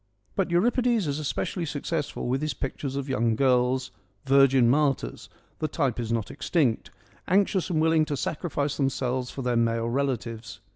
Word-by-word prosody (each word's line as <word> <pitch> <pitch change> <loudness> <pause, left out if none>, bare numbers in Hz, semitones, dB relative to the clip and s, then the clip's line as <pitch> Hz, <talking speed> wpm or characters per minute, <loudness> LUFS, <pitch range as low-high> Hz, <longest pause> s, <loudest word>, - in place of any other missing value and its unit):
But 190 -2 0
Euripides 235 +4 +2
is 145 0 -2
especially 155 +4 -2
successful 150 -1 -3
with 130 +3 0
his 155 -1 -2
pictures 135 0 -4
of 140 0 -3
young 115 -4 +1
girls, 130 0 +2 0.3
virgin 135 -2 +5
martyrs 135 - 0
— - - -37
the 155 - 0
type 140 -6 -1
is 115 -1 -3
not 115 -3 -1
extinct 135 -10 0 0.2
— - - -29
anxious 190 0 +2
and 165 -3 +1
willing 160 0 +3
to 145 -2 -3
sacrifice 145 -1 -2
them 135 -2 +2
selves 125 -1 -2
for 135 - -6
their 125 -1 0
male 115 0 +1
relatives. 115 -4 -3
135 Hz, 175 wpm, -26 LUFS, 125-155 Hz, 0.3 s, virgin